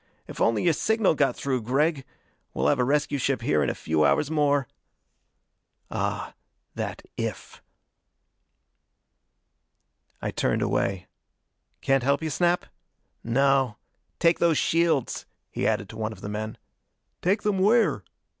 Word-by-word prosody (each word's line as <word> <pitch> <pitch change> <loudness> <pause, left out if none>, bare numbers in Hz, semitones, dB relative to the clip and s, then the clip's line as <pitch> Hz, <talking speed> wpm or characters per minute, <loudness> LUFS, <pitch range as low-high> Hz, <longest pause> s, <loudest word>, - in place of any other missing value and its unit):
If - - -8
only 115 -2 +2
your 170 - +4
signal 220 +5 +2
got 145 -3 +1
through, 130 -3 -1
Gregg! 135 +4 0 0.5
We'll - - +2
have 140 - +2
a - - +4
rescue 145 +2 +1
ship 130 -2 0
here 75 -8 +2
in 70 - +1
a - - -2
few 80 -1 0
hours 145 - +2
more." 145 -3 +2 1.2
Ah, - - -2 0.4
that - - -5
"if!" - - -5 2.6
I - - -3
turned - - 0
away. 95 -2 -1 0.8
"Can't 135 -1 +2
help 140 +5 +1
you, 160 - -2
Snap?" 175 +4 +1 0.6
"No. 135 -1 +2 0.4
Take 170 0 +3
those 165 -3 +3
shields," 165 -6 +1 0.2
he - - -1
added 100 - 0
to 110 - -9
one 110 0 -2
of 105 -4 -11
the 100 - -5
men. 110 +1 -4 0.6
"Take 195 +4 +1
them 205 -2 +1
where?" 205 - +3
140 Hz, 135 wpm, -26 LUFS, 115-165 Hz, 2.6 s, your